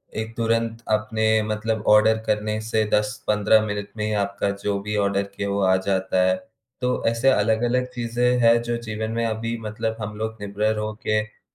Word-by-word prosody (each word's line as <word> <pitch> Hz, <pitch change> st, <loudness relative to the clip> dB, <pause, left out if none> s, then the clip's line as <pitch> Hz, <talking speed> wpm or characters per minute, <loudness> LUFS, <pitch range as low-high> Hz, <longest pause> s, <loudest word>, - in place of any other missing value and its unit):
एक 110 Hz, +1 st, -4 dB
तुरंत 115 Hz, 0 st, 0 dB
आपने 110 Hz, 0 st, +1 dB
मतलब 110 Hz, 0 st, -2 dB
आर्डर 110 Hz, +1 st, +6 dB
करने 105 Hz, 0 st, 0 dB
से 110 Hz, 0 st, 0 dB
10-15 105 Hz, 0 st, +2 dB
मिनट 105 Hz, -1 st, -3 dB
में 105 Hz, -, -1 dB
ही 110 Hz, -, -1 dB
आपका 100 Hz, -1 st, -1 dB
जो 100 Hz, -1 st, 0 dB
भी 105 Hz, +1 st, -3 dB
आर्डर 100 Hz, 0 st, +1 dB
किया 100 Hz, 0 st, -3 dB
वो 100 Hz, 0 st, 0 dB
आ 95 Hz, 0 st, +4 dB
जाता 95 Hz, -1 st, +1 dB
है। 95 Hz, -, +3 dB, 0.5 s
तो 125 Hz, 0 st, 0 dB
ऐसे 115 Hz, +4 st, +3 dB
अलग-अलग 120 Hz, +2 st, +2 dB
चीज़ें 120 Hz, +1 st, +1 dB
हैं 115 Hz, 0 st, +5 dB
जो 120 Hz, 0 st, -2 dB
जीवन 110 Hz, -1 st, -4 dB
में 115 Hz, 0 st, -1 dB
अभी 115 Hz, +1 st, -2 dB
मतलब 110 Hz, +1 st, -3 dB
हम 105 Hz, 0 st, -5 dB
लोग 110 Hz, 0 st, -4 dB
निर्भर 105 Hz, +2 st, -1 dB
होके 110 Hz, 0 st, -2 dB
110 Hz, 175 wpm, -23 LUFS, 105-115 Hz, 0.5 s, आर्डर